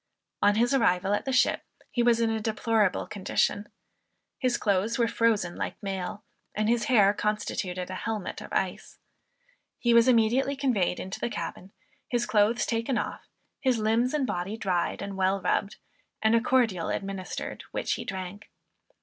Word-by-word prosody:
On 205 0 +4
his 240 +4 +2
arrival 195 -6 +2
at 205 - -1
the 265 - -1
ship, 255 - +3 0.3
he 240 - 0
was 235 -1 +4
in 230 -1 +2
a 220 - -1
deplorable 220 -2 +1
condition. 205 +1 -1 0.7
His 255 -3 +1
clothes 205 +3 +1
were 235 -2 +3
frozen 220 -7 +1
like - - -3
mail, 195 +1 -4 0.3
and 215 0 0
his 235 -1 +2
hair 205 -5 +5
constituted 195 -4 -2
a 185 - -5
helmet 220 -4 -4
of - - -10
ice. - - -2 0.8
He 240 -1 +2
was 235 +1 +6
immediately 250 +3 +3
conveyed 240 -11 0
into 190 - -6
the - - -1
cabin, 190 -4 -6 0.4
his 240 -1 0
clothes 220 +1 +2
taken 230 +2 -1
off, - - -4 0.3
his 260 -3 +2
limbs 225 +5 +1
and 285 -3 +1
body 205 -1 -3
dried 185 -5 -1
and 200 -1 -6
well 190 +1 +2
rubbed, 200 +1 0 0.4
and 220 +1 +3
a 230 - +4
cordial 230 -9 +1
administered 195 -2 -4
which - - -1
he - - -4
drank. 190 +1 -6
215 Hz, 165 wpm, -27 LUFS, 195-235 Hz, 0.8 s, was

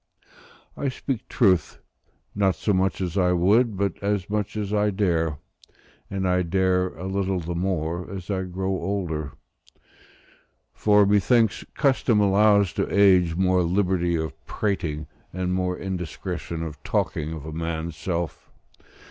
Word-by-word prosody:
I 140 - -1
speak 130 -2 -4
truth, 95 - +2 0.6
not 95 -3 +2
so 105 - 0
much 95 +1 +1
as 90 +1 -1
I 90 -1 +3
would, 100 +5 +3
but 100 -2 -1
as 100 -1 -1
much 105 0 -2
as 105 -1 -3
I 105 0 +2
dare; 85 -6 0 0.7
and 95 -1 -2
I 90 0 +2
dare 90 +1 +1
a 90 - -7
little 95 -1 -1
the 85 +1 -4
more, 85 -1 -2
as 95 0 -6
I 95 -1 0
grow 95 +1 -3
older; 85 -6 -2 1.4
for, 105 -1 +4
methinks, 110 +2 +3
custom 130 -5 +2
allows 100 -1 +4
to - - -2
age 95 -4 +4
more 95 0 +2
liberty 90 -1 +1
of 80 -1 -2
prating, 80 -7 -2 0.3
and 90 0 -2
more 90 -1 -1
indiscretion 85 -2 -4
of 75 -3 -7
talking 75 +1 -1
of 80 -2 -7
a 80 - -6
man's 80 0 -3
self. 85 -1 -4
95 Hz, 140 wpm, -24 LUFS, 85-100 Hz, 1.4 s, for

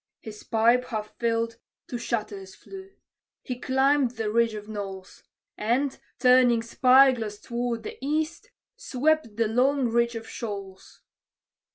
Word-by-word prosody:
His 210 -1 -10
pipe, 235 +3 +2
half 215 -3 -5
filled, 230 -1 -1 0.3
to 245 - -5
shatters 210 -5 -4
flew; 385 0 -11 0.5
he 250 -1 -5
climbed 265 -1 +2
the 220 -2 -2
ridge 230 0 +2
of 210 0 -8
knolls; 195 -3 -7 0.4
And, 250 +6 0 0.2
turning 250 -2 +4
spy 260 +3 +5
glass 220 -4 -5
toward 235 +1 -3
the - - -8
east, 310 +3 -2 0.3
swept 310 - 0
the 230 -1 +2
long 255 +3 +2
reach 235 +1 +1
of 225 0 -7
Shoals. 195 -4 -8
235 Hz, 135 wpm, -26 LUFS, 215-260 Hz, 0.5 s, spy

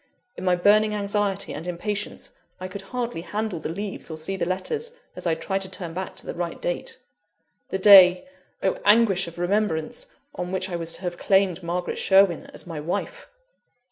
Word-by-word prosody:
In - - -8
my 180 -1 +3
burning 210 +4 +4
anxiety 200 -1 -1
and 165 - -7
impatience 200 +4 -4 0.3
I 185 - -5
could 190 +1 -7
hardly 240 -8 -3
handle 210 -1 -3
the 155 - -5
leaves 195 +3 -5
or 160 - -6
see 160 +5 -3
the 185 - -2
letters, 440 - -2 0.2
as - - -4
I 165 - +2
tried 195 +4 -2
to 190 - -5
turn 180 -3 -5
back 185 +1 -5
to - - -8
the - - -4
right 170 -1 -4
date 175 - -3 0.7
the - - -1
day 185 +1 +8 0.4
(oh - - +1
anguish 205 -4 +4
of 170 - -10
remembrance!) 175 -3 -1 0.3
on 180 0 -5
which 190 0 -1
I - - -2
was 165 -1 -3
to - - -4
have 175 -1 -4
claimed 190 -2 +2
Margaret 175 +1 -3
Sherwin 190 -4 +4
as - - -11
my 165 -3 -6
wife! 175 - -4
185 Hz, 190 wpm, -24 LUFS, 175-205 Hz, 0.7 s, day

